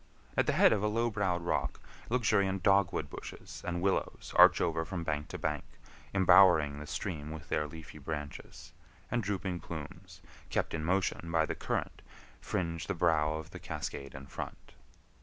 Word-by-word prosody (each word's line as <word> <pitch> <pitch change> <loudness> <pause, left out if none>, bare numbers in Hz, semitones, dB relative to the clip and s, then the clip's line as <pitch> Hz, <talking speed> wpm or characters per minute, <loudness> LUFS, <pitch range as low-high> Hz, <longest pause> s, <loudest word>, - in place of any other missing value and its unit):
At - - +2
the - - +3
head - - +6
of 105 - 0
a 105 - +2
low 115 +2 +1
browed 95 -5 0
rock, 85 - -1 0.3
luxuriant 100 -6 +2
dogwood 100 -2 +3
bushes - - -9
and 85 0 -2
willows 95 -1 -1
arch - - +8
over 80 -1 +1
from 85 +1 -4
bank 75 -2 -2
to - - -6
bank, 75 -3 -2 0.5
embowering 90 -6 +6
the 75 - -8
stream 75 -4 -4
with 80 0 -8
their 75 0 0
leafy 80 0 -10
branches; 75 0 -7 0.4
and 120 +1 +1
drooping 95 -3 -2
plumes, 80 -5 -9 0.3
kept - - -1
in 80 -1 -2
motion 90 -1 0
by 80 -1 +3
the - - -3
current, - - -3 0.4
fringe 85 - -2
the 100 - -1
brow 75 -2 +3
of 80 0 -7
the - - -8
cascade 70 -1 -5
in 65 0 -8
front. 70 - -8
85 Hz, 170 wpm, -32 LUFS, 75-95 Hz, 0.5 s, arch